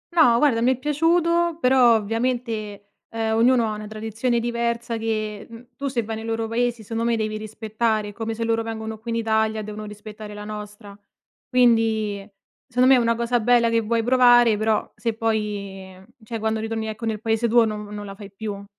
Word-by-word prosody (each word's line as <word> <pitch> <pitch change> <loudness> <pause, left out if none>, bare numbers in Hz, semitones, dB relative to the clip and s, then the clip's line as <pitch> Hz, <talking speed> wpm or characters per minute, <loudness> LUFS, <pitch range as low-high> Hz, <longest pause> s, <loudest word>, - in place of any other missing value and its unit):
No, 245 -9 +6
guarda 240 -4 +3
mi 255 +2 +4
è - - -16
piaciuto 335 +4 +1
però 250 -3 +5
ovviamente, 225 -2 -2 0.2
ehm, 225 -1 -1
ognuno 235 +1 +4
ha 215 - -2
una 210 0 -7
tradizione 225 +3 -2
diversa 235 0 -2
che, 215 -2 -3
mhmm, 230 +1 -12
tu 280 +2 -4
se 245 -3 -1
vai 220 +1 -5
nei 220 - -7
loro 225 0 -2
paesi 235 0 -1
secondo 225 +2 -3
me 230 - +1
devi 215 -1 -2
rispettare, 215 0 -2
come 225 +1 -4
se 230 - -3
loro 225 0 +1
vengono 220 -1 -5
qui 230 +1 -9
in 230 - -1
Italia 220 -1 0
devono 215 0 -7
rispettare 210 0 -9
la 210 - -7
nostra, 210 -1 -8 0.5
quindi 225 -5 +2 0.4
secondo 250 0 +2
me 270 - +8
è - - +3
una 230 0 +2
cosa 235 +1 0
bella 235 0 +3
che 230 - +3
vuoi 230 +1 0
provare 245 -2 +5
però 215 +1 0
se 230 -1 -2
poi 205 -4 -3 0.3
cioè, 225 +1 -5
quando 220 0 -1
ritorni, 225 0 -3
ecco, 220 +2 -5
nel 220 -2 -2
paese 225 +1 +1
tuo 235 0 +5
non 210 -1 -4
non 205 0 -7
la 195 - -7
fai 200 0 -11
più. 200 -1 -6
225 Hz, 195 wpm, -23 LUFS, 215-235 Hz, 0.5 s, me